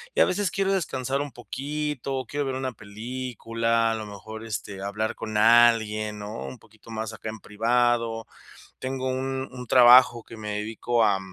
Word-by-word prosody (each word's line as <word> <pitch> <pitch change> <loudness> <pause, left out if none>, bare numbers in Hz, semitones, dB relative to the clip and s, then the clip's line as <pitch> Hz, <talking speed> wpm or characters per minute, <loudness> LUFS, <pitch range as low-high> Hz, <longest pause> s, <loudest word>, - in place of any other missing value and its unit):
Y - - +4
a - - +8
veces 195 0 0
quiero 195 +1 0
descansar 135 -7 -1
un 145 -1 -5
poquito, 135 0 -4
quiero 145 +4 -2
ver 130 - -2
una 130 0 -2
película, 115 +1 -2
a - - -1
lo 110 -1 -5
mejor, 110 +2 -9
este, 105 -3 -5
hablar 105 +2 -2
con 110 -1 -4
alguien, 110 -2 +4
¿no?, 105 +2 -6
un 130 - -8
poquito 110 0 -20
más 110 0 -4
acá 110 - -6
en 110 0 -7
privado. 115 +1 +1 0.5
Tengo 130 0 -3
un 130 +1 -2
un 125 -1 -8
trabajo 120 -1 +7
que 115 - -11
me 105 -1 -6
dedico 115 +2 0
a 100 -2 +3
115 Hz, 175 wpm, -26 LUFS, 110-130 Hz, 0.5 s, a